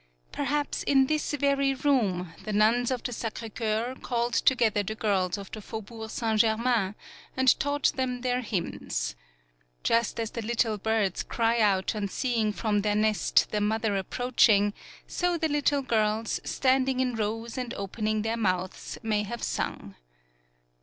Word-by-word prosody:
Perhaps 290 +1 -1
in 270 -1 +4
this 305 +2 -1
very 275 -1 +2
room 210 - +1
the 215 - -4
nuns 225 +4 +3
of 255 -3 -2
the 245 - -3
Sacre 225 0 -5
Coeur 225 +2 -1
called 240 0 -1
together 230 -6 +3
the 215 +2 -4
girls 195 -4 0
of 200 -1 -9
the 215 - -6
Faubourg 220 +1 -7
Saint 220 -1 -1
Germain 220 -2 +2 0.4
and 260 -1 +4
taught 285 0 +1
them 250 -2 -2
their 250 0 0
hymns. 210 -7 -3 0.7
Just 230 0 +1
as 225 -1 -2
the 230 - -4
little 225 -1 0
birds 215 -3 0
cry 230 0 0
out 195 -4 +2
on 205 -1 -1
seeing 225 0 0
from 210 -1 0
their 210 0 +1
nest 215 0 +2
the 210 - 0
mother 215 0 0
ap 190 -2 -2
35 - - -37
PAULOWNIA 250 0 -3
preaching, 205 -4 +5 0.3
so 355 -1 0
the 320 -1 +1
little 290 -1 +1
girls, 220 -2 0
standing 260 0 +1
in 255 -1 +1
rows 225 +1 -3
and 250 -3 -4
opening 215 +2 -2
their 225 +1 -1
mouths, 185 -4 -2
may 215 -2 +1
have 225 +3 -5
sung. - - -3
225 Hz, 165 wpm, -27 LUFS, 210-255 Hz, 0.7 s, preaching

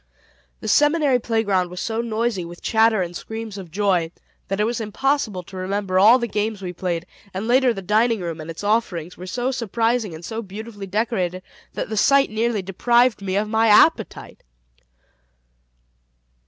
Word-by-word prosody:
The 220 - -6
Seminary 295 +2 +3
playground 205 -6 0
was 180 0 -7
so 225 +2 -2
noisy 230 -4 -1
with 175 +1 -10
chatter 220 -3 +3
and 175 0 -7
screams 220 0 -6
of 185 -3 -9
joy, 180 -3 +1 0.4
that 195 +1 -2
it - - +3
was 230 +1 -1
impossible 220 -3 -1
to 190 - -13
remember 190 0 -1
all 220 +6 +7
the 240 - -2
games 210 0 -2
we 180 -2 -6
played; 175 -1 -3 0.3
and 200 +4 -3
later 255 +1 +4
the 195 -4 -5
dining 220 +4 +2
room 170 -3 -5
and 155 - -9
its 165 +4 -7
offerings 200 -6 -1
were 185 - -9
so 245 +7 -1
surprising 230 -4 -1
and 165 +2 -10
so 225 0 -4
beautifully 205 0 -8
decorated 185 -3 -1 0.3
that - - -4
the 220 - -3
sight 275 +3 +4
nearly 220 -2 0
deprived 235 +5 +2
me 190 -1 -2
of 210 +2 0
my 220 +1 +2
appetite. 220 +2 +3
210 Hz, 170 wpm, -22 LUFS, 185-230 Hz, 0.4 s, all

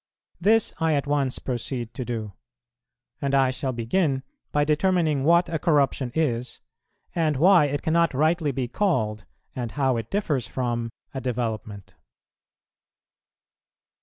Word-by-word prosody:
This 215 +5 +3
I 160 -2 +2
at 140 - 0
once 140 -3 0
proceed 120 -1 -4
to 130 - -4
do, 110 -4 -4 0.9
and 140 0 +1
I 135 -1 +4
shall 130 0 -3
begin 130 +4 0 0.3
by 145 - +2
determining 155 -2 +2
what 170 +4 +4
a 160 - -2
corruption 140 -5 +1
is, 125 -6 -1 0.5
and 155 -4 +1
why 175 +1 +6
it 145 0 -2
cannot 165 -2 +2
rightly 155 +1 +2
be 130 -2 -2
called, 110 - 0 0.3
and 120 -3 -4
how 135 -4 +1
it 115 -1 -5
differs 150 - -1
from, 120 -2 -2 0.2
a 135 - -4
development. 110 -5 -4
135 Hz, 135 wpm, -25 LUFS, 120-160 Hz, 0.9 s, why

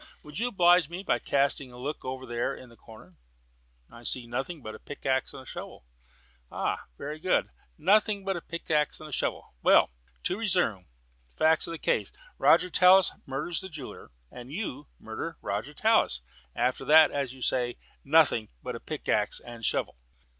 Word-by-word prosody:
Would 150 +4 -8
you 240 - +1
oblige 175 -6 +4
me 175 +3 -6
by - - +1
casting 140 -1 0
a 120 - -12
look 140 +5 -5
over 130 0 -5
there 120 -1 -2
in 130 - -12
the 115 - -17
corner?" 105 -6 -16 0.7
"I 120 - -14
see 120 +1 -2
nothing 135 +6 -4
but 110 - -6
a 110 - -10
pickaxe 135 -2 -2
and 130 -2 -11
shovel." - - -8 0.6
"Ha! - - -3
very 150 +2 -6
good; 185 +3 +1 0.3
'nothing 200 +4 +3
but 195 -1 0
a 170 - -4
pickaxe 155 -3 -1
and 155 -2 -9
shovel.' - - -2
Well, - - +5 0.3
to - - -1
resume: 175 - +1 0.5
facts 160 0 +3
of - - -5
the - - -4
case - - 0 0.3
Roger 180 - +5
Tallis 185 +1 +6 0.2
murders 140 +6 -2
the 190 - -7
jeweller, 155 -6 -9 0.2
and 125 +2 -10
you 150 -6 -5
murder 150 +9 -6
Roger 105 +8 -3
Tallis; 215 - +2 0.3
after 125 +1 0
that, 155 0 +7
as 135 -3 -2
you 130 - -8
say, 120 -1 +1 0.3
'nothing 140 -7 +4
but - - -4
a - - -6
pickaxe - - -1
and 120 -1 -11
shovel.'" - - -1
145 Hz, 170 wpm, -28 LUFS, 120-175 Hz, 0.7 s, that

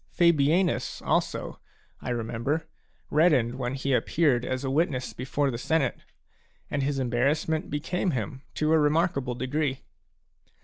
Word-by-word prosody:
Fabianus 170 +1 +2
also, - - -1 0.4
I - - -5
remember, 120 +6 -2 0.5
reddened 135 -6 +3
when 125 +1 -2
he 135 0 -1
appeared 130 -2 +2
as 130 +1 -2
a 135 - -1
witness 140 -4 0
before 135 +2 -1
the 120 - -4
senate; 155 0 0 0.7
and 145 - 0
his 140 +1 0
embarrassment 135 +5 0
became 180 +6 -1
him 130 - -3
to 155 +1 +2
a 160 - +5
remarkable 150 -4 +1
degree. 135 +1 -1
140 Hz, 130 wpm, -27 LUFS, 125-155 Hz, 0.7 s, a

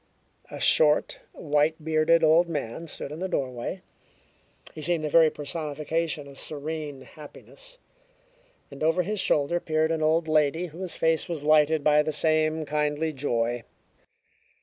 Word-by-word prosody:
A - - -8
short, 150 -1 +3
white 150 +1 0
bearded 160 +1 +3
old 165 +2 +4
man 150 +1 -4
stood 145 - -7
in 155 - -7
the 190 - -2
doorway. 130 +3 -4 0.9
He 155 - -8
seemed 170 0 -1
the 150 - -3
very 160 0 +6
personification 155 0 -4
of 140 -1 -7
serene 150 -2 -4
happiness, 330 - -12 0.9
and 140 - -11
over 165 +3 +2
his 210 +3 -3
shoulder 150 0 +1
peered 160 -1 0
an 160 -1 -1
old 160 +1 +2
lady 155 +2 +2
whose 175 +2 -6
face 160 +2 +1
was 160 -4 -4
lighted 155 0 +3
by 150 0 +5
the 155 +1 -2
same 155 +1 +1
kindly 150 +1 -1
joy. 120 -3 -1
155 Hz, 145 wpm, -26 LUFS, 150-165 Hz, 0.9 s, very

